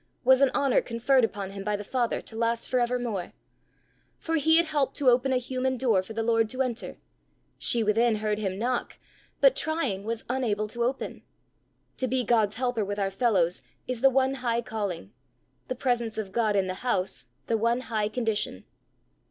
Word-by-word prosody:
was 260 Hz, +1 st, +5 dB
an 275 Hz, -, +6 dB
honour 275 Hz, -3 st, +3 dB
conferred 245 Hz, +2 st, +2 dB
upon 200 Hz, -3 st, -2 dB
him 195 Hz, 0 st, -7 dB
by 210 Hz, +1 st, 0 dB
the 205 Hz, -, -5 dB
Father, 240 Hz, +2 st, -1 dB
to 225 Hz, -, -10 dB
last 230 Hz, 0 st, -1 dB
for 255 Hz, -, +1 dB
evermore! 240 Hz, -6 st, -2 dB, 0.8 s
For 325 Hz, 0 st, -1 dB
he 320 Hz, +2 st, +5 dB
had 335 Hz, -, +5 dB
helped 295 Hz, -4 st, 0 dB
to 265 Hz, -3 st, +4 dB
open 250 Hz, +2 st, +2 dB
a 260 Hz, -, +3 dB
human 255 Hz, +1 st, -2 dB
door 230 Hz, -7 st, +2 dB
for 185 Hz, +4 st, -10 dB
the 225 Hz, 0 st, -2 dB
Lord 225 Hz, -1 st, +2 dB
to 260 Hz, +2 st, 0 dB
enter! 240 Hz, -2 st, -4 dB, 0.6 s
she 235 Hz, -2 st, +1 dB
within 225 Hz, +2 st, +3 dB
heard 210 Hz, 0 st, -1 dB
him 190 Hz, -3 st, -2 dB
knock, 245 Hz, +3 st, -2 dB, 0.4 s
but, -, -, +6 dB
trying, 315 Hz, -12 st, -1 dB
was 225 Hz, +1 st, -4 dB
unable 225 Hz, -5 st, -1 dB
to 235 Hz, +2 st, -2 dB
open! 255 Hz, +3 st, -3 dB, 0.8 s
To 260 Hz, -, -1 dB
be 255 Hz, +1 st, 0 dB
God's 220 Hz, -3 st, +2 dB
helper 245 Hz, -2 st, 0 dB
with 205 Hz, +1 st, -4 dB
our 195 Hz, -1 st, 0 dB
fellows 190 Hz, -5 st, +1 dB, 0.3 s
is 250 Hz, -2 st, -3 dB
the 270 Hz, -, +7 dB
one 265 Hz, 0 st, +2 dB
high 235 Hz, -1 st, 0 dB
calling; 195 Hz, -, -4 dB, 0.5 s
the 255 Hz, -, -3 dB
presence 240 Hz, -3 st, -1 dB
of 205 Hz, -3 st, -4 dB
God 215 Hz, -1 st, +1 dB
in 195 Hz, -1 st, +2 dB
the 185 Hz, 0 st, -5 dB
house 240 Hz, -7 st, -2 dB, 0.2 s
the 230 Hz, -, 0 dB
one 235 Hz, +3 st, +1 dB
high 215 Hz, -4 st, -1 dB
condition. 220 Hz, -, -2 dB
235 Hz, 190 wpm, -27 LUFS, 210-255 Hz, 0.8 s, the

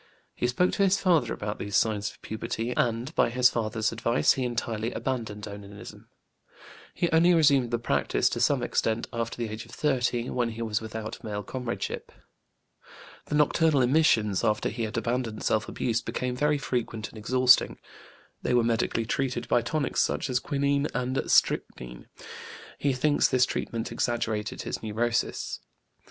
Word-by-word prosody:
He 125 Hz, -, -1 dB
spoke 155 Hz, +9 st, +2 dB
to 200 Hz, -, +1 dB
his 195 Hz, 0 st, +3 dB
father 175 Hz, -6 st, +2 dB
about 105 Hz, 0 st, -4 dB
these 100 Hz, -1 st, 0 dB
signs 105 Hz, -2 st, +1 dB
of -, -, -16 dB
puberty, 115 Hz, +2 st, -3 dB
and 120 Hz, +5 st, 0 dB
by -, -, +3 dB
his 125 Hz, +1 st, +4 dB
father's 110 Hz, -1 st, -1 dB
advice 115 Hz, +1 st, +2 dB
he 130 Hz, -, -2 dB
entirely 115 Hz, -2 st, -2 dB
abandoned 110 Hz, -5 st, -4 dB
onanism; 100 Hz, 0 st, -10 dB, 0.9 s
he 175 Hz, -, +1 dB
only 170 Hz, +2 st, +5 dB
resumed 140 Hz, -6 st, +4 dB
the 120 Hz, -, 0 dB
practice, 120 Hz, -, +1 dB
to -, -, -3 dB
some -, -, +2 dB
extent, 110 Hz, +1 st, 0 dB
after 115 Hz, -1 st, -3 dB
the 120 Hz, -1 st, -2 dB
age 110 Hz, +1 st, -6 dB
of 115 Hz, -, -17 dB
30, 125 Hz, -3 st, 0 dB
when 120 Hz, -2 st, 0 dB
he 115 Hz, +1 st, -5 dB
was 110 Hz, -1 st, -1 dB
without 110 Hz, 0 st, -6 dB
male 105 Hz, -1 st, -4 dB
comradeship. 125 Hz, -1 st, -4 dB, 1.1 s
The 150 Hz, -, -3 dB
nocturnal 150 Hz, -1 st, +3 dB
emissions, 120 Hz, -8 st, +3 dB
after 105 Hz, 0 st, +1 dB
he 115 Hz, 0 st, -3 dB
had 110 Hz, +2 st, -5 dB
abandoned 115 Hz, -1 st, -2 dB
self 110 Hz, -1 st, +1 dB
abuse, 115 Hz, -1 st, -1 dB
became 125 Hz, -1 st, -3 dB
very 150 Hz, +3 st, +2 dB
frequent 115 Hz, -5 st, -3 dB
and -, -, -13 dB
exhausting. 125 Hz, +3 st, +4 dB, 0.6 s
They 125 Hz, -, 0 dB
were 120 Hz, -, +4 dB
medically 115 Hz, 0 st, 0 dB
treated 125 Hz, 0 st, -2 dB
by 120 Hz, -, +3 dB
tonics 145 Hz, +4 st, 0 dB
such 135 Hz, -, -1 dB
as 125 Hz, -, +2 dB
quinine 140 Hz, +1 st, 0 dB
and 125 Hz, +2 st, -1 dB
strychnine. -, -, +1 dB, 0.7 s
He 140 Hz, -2 st, +1 dB
thinks 145 Hz, +3 st, +3 dB
this 130 Hz, 0 st, +3 dB
treatment 115 Hz, -2 st, -4 dB
exaggerated 115 Hz, -2 st, -2 dB
his -, -, -4 dB
neurosis. 115 Hz, +2 st, -1 dB
120 Hz, 160 wpm, -27 LUFS, 110-130 Hz, 1.1 s, only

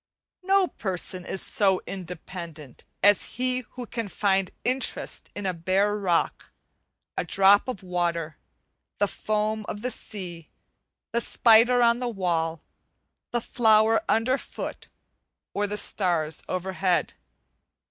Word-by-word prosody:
No 385 Hz, +1 st, +3 dB
person 185 Hz, -, -3 dB
is 190 Hz, -, +3 dB
so 190 Hz, -3 st, +3 dB
independent 170 Hz, -5 st, -8 dB, 0.2 s
as 205 Hz, 0 st, +4 dB
he 255 Hz, 0 st, +1 dB
who 250 Hz, -1 st, -6 dB
can 230 Hz, -1 st, -4 dB
find 195 Hz, -1 st, +1 dB
interest 255 Hz, +2 st, -1 dB
in 205 Hz, -, -5 dB
a 185 Hz, -, 0 dB
bare 190 Hz, +5 st, +1 dB
rock, 185 Hz, -5 st, 0 dB, 0.7 s
a -, -, -1 dB
drop 195 Hz, +3 st, +4 dB
of 250 Hz, -7 st, -5 dB
water, 170 Hz, -3 st, -2 dB, 0.6 s
the 205 Hz, -, +2 dB
foam 215 Hz, +1 st, -1 dB
of 205 Hz, -, -6 dB
the 250 Hz, -, -1 dB
sea, 180 Hz, -8 st, -5 dB, 0.6 s
the 235 Hz, -, +1 dB
spider 235 Hz, +2 st, +5 dB
on 235 Hz, 0 st, +4 dB
the 250 Hz, -1 st, -2 dB
wall, 165 Hz, -6 st, -1 dB, 0.7 s
the 240 Hz, -1 st, -1 dB
flower 220 Hz, -1 st, +4 dB
underfoot 255 Hz, +5 st, -1 dB, 0.7 s
or 205 Hz, 0 st, 0 dB
the 210 Hz, +1 st, -3 dB
starts 170 Hz, -8 st, 0 dB
overhead. 185 Hz, 0 st, 0 dB
200 Hz, 120 wpm, -26 LUFS, 180-225 Hz, 0.7 s, spider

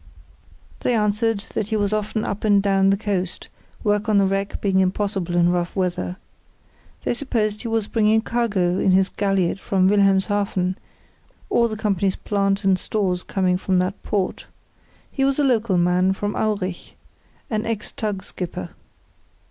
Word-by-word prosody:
They 245 Hz, -, +1 dB
answered 210 Hz, 0 st, +1 dB
that 205 Hz, -, -1 dB
he 220 Hz, -, 0 dB
was 205 Hz, -1 st, 0 dB
often 215 Hz, +1 st, -1 dB
up 200 Hz, -, -4 dB
and 205 Hz, -2 st, +4 dB
down 195 Hz, -1 st, +3 dB
the 195 Hz, -, +3 dB
coast, 190 Hz, -4 st, -3 dB, 0.3 s
work 210 Hz, 0 st, +1 dB
on 210 Hz, -, +4 dB
the 200 Hz, -, +4 dB
wreck 195 Hz, +1 st, -1 dB
being 195 Hz, -2 st, +1 dB
impossible 190 Hz, -1 st, 0 dB
in 175 Hz, 0 st, +4 dB
rough 175 Hz, -1 st, -1 dB
weather. 180 Hz, -1 st, -1 dB, 0.9 s
They -, -, 0 dB
supposed 225 Hz, -5 st, -1 dB
he 235 Hz, -, -5 dB
was 225 Hz, -2 st, 0 dB
bringing 220 Hz, 0 st, +2 dB
cargo 205 Hz, -7 st, 0 dB
in 190 Hz, -, +3 dB
his 190 Hz, 0 st, +3 dB
galliot 195 Hz, -2 st, 0 dB
from 190 Hz, -1 st, +2 dB
Wilhelmshaven, 195 Hz, -1 st, +2 dB, 0.8 s
all 235 Hz, -, +4 dB
the 215 Hz, -1 st, -5 dB
company's 195 Hz, -3 st, 0 dB
plant 195 Hz, 0 st, 0 dB
and 190 Hz, -1 st, +3 dB
stores 185 Hz, -4 st, -1 dB
coming 185 Hz, -1 st, 0 dB
from 190 Hz, -1 st, +1 dB
that 185 Hz, +2 st, -1 dB
port. 195 Hz, -3 st, -2 dB, 0.6 s
He 270 Hz, -, -1 dB
was 275 Hz, 0 st, +2 dB
a 295 Hz, -, +2 dB
local 230 Hz, -7 st, +2 dB
man 180 Hz, +2 st, +3 dB
from 205 Hz, +2 st, -3 dB
Aurich; 200 Hz, -5 st, -2 dB, 0.6 s
an 215 Hz, 0 st, -1 dB
ex 225 Hz, -2 st, -3 dB
tug 205 Hz, -3 st, -3 dB
skipper. 170 Hz, -, -6 dB
200 Hz, 160 wpm, -22 LUFS, 185-215 Hz, 0.9 s, and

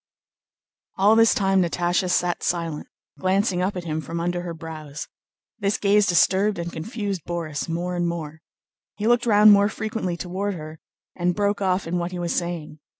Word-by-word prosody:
All 205 Hz, +3 st, +5 dB
this 225 Hz, 0 st, +5 dB
time 195 Hz, -1 st, +3 dB
Natásha 175 Hz, +1 st, 0 dB
sat 180 Hz, 0 st, +1 dB
silent, 165 Hz, -3 st, -2 dB, 0.3 s
glancing 190 Hz, 0 st, +1 dB
up 190 Hz, +2 st, -1 dB
at 180 Hz, -, -4 dB
him 160 Hz, -1 st, -3 dB
from 165 Hz, +2 st, -5 dB
under 175 Hz, +1 st, -1 dB
her 175 Hz, -1 st, -5 dB
brows. 155 Hz, -2 st, -8 dB, 0.5 s
This 200 Hz, 0 st, 0 dB
gaze 205 Hz, 0 st, +3 dB
disturbed 195 Hz, +3 st, +3 dB
and 170 Hz, 0 st, -5 dB
confused 200 Hz, +1 st, -4 dB
Borís 165 Hz, -3 st, -4 dB
more 175 Hz, +2 st, -2 dB
and 175 Hz, 0 st, 0 dB
more. 160 Hz, -2 st, -5 dB, 0.5 s
He 210 Hz, -, -4 dB
looked 240 Hz, +1 st, +3 dB
round 210 Hz, -1 st, +7 dB
more 205 Hz, 0 st, +5 dB
frequently 215 Hz, -5 st, -3 dB
toward 190 Hz, +3 st, -3 dB
her, 155 Hz, -1 st, -9 dB, 0.4 s
and 175 Hz, 0 st, 0 dB
broke 205 Hz, 0 st, 0 dB
off 185 Hz, 0 st, +1 dB
in 175 Hz, +2 st, -1 dB
what 170 Hz, +1 st, -3 dB
he 180 Hz, -, -5 dB
was 175 Hz, -1 st, -2 dB
saying. 170 Hz, -3 st, -4 dB
180 Hz, 175 wpm, -24 LUFS, 170-200 Hz, 0.5 s, round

